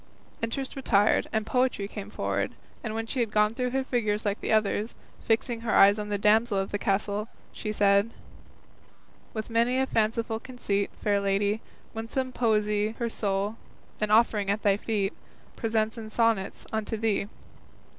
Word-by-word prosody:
Interest 260 Hz, +4 st, -3 dB
retired, 215 Hz, -6 st, +2 dB
and 220 Hz, -1 st, 0 dB
Poetry 250 Hz, -5 st, +1 dB
came 205 Hz, 0 st, -7 dB
forward, 100 Hz, -, -2 dB, 0.3 s
and 220 Hz, -1 st, -3 dB
when 225 Hz, 0 st, -2 dB
she 250 Hz, -, -3 dB
had 235 Hz, -2 st, +1 dB
gone 210 Hz, 0 st, +3 dB
through 250 Hz, +1 st, -1 dB
her 265 Hz, +1 st, 0 dB
figures 220 Hz, -4 st, -1 dB
like 205 Hz, 0 st, -1 dB
the -, -, -2 dB
others, 215 Hz, +1 st, +1 dB, 0.3 s
fixing 230 Hz, +1 st, +1 dB
her 230 Hz, -1 st, -1 dB
eyes 200 Hz, +2 st, +7 dB
on 210 Hz, 0 st, -4 dB
the 205 Hz, -, 0 dB
damsel 210 Hz, +1 st, +3 dB
of 195 Hz, 0 st, -1 dB
the 205 Hz, -, -1 dB
castle, 205 Hz, +2 st, 0 dB, 0.3 s
she 215 Hz, -, -4 dB
said: 200 Hz, 0 st, +3 dB, 1.3 s
With 220 Hz, +1 st, -4 dB
many 235 Hz, +3 st, +2 dB
a 265 Hz, -, +3 dB
fanciful 225 Hz, -1 st, 0 dB
conceit, 205 Hz, -6 st, -2 dB
Fair 205 Hz, -1 st, +2 dB
Lady, 200 Hz, +2 st, +1 dB, 0.3 s
winsome 230 Hz, +4 st, -3 dB
Poesy 215 Hz, -2 st, +1 dB
Her 235 Hz, -1 st, -1 dB
soul, 205 Hz, 0 st, -1 dB, 0.4 s
an 215 Hz, -, 0 dB
offering 215 Hz, -2 st, +3 dB
at 205 Hz, +2 st, 0 dB
thy 200 Hz, -1 st, +4 dB
feet, 205 Hz, -1 st, -1 dB, 0.4 s
Presents 220 Hz, -1 st, 0 dB
in 220 Hz, -1 st, -7 dB
sonnets 225 Hz, -3 st, 0 dB
unto 220 Hz, 0 st, -2 dB
thee. 215 Hz, -2 st, 0 dB
215 Hz, 165 wpm, -27 LUFS, 205-230 Hz, 1.3 s, eyes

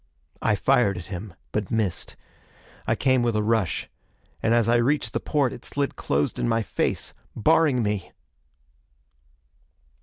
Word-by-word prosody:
I 105 Hz, -, +3 dB
fired 120 Hz, -4 st, +3 dB
at 90 Hz, -, -7 dB
him, 90 Hz, 0 st, -7 dB, 0.2 s
but 105 Hz, -3 st, -2 dB
missed. 105 Hz, -6 st, -1 dB, 0.7 s
I -, -, +3 dB
came 130 Hz, -2 st, +3 dB
with 120 Hz, -2 st, +1 dB
a 105 Hz, -, +1 dB
rush. 110 Hz, -5 st, 0 dB, 0.5 s
And 115 Hz, -, +1 dB
as 115 Hz, -1 st, +4 dB
I 120 Hz, +1 st, +4 dB
reached 135 Hz, +5 st, +1 dB
the -, -, 0 dB
porte 140 Hz, -5 st, +1 dB
it -, -, -10 dB
slid 140 Hz, -1 st, -2 dB
closed 70 Hz, +1 st, -1 dB
in -, -, +1 dB
my 115 Hz, 0 st, +2 dB
face, -, -, -2 dB, 0.2 s
barring 145 Hz, -1 st, +3 dB
me! 105 Hz, -3 st, -2 dB
115 Hz, 150 wpm, -25 LUFS, 105-130 Hz, 0.7 s, as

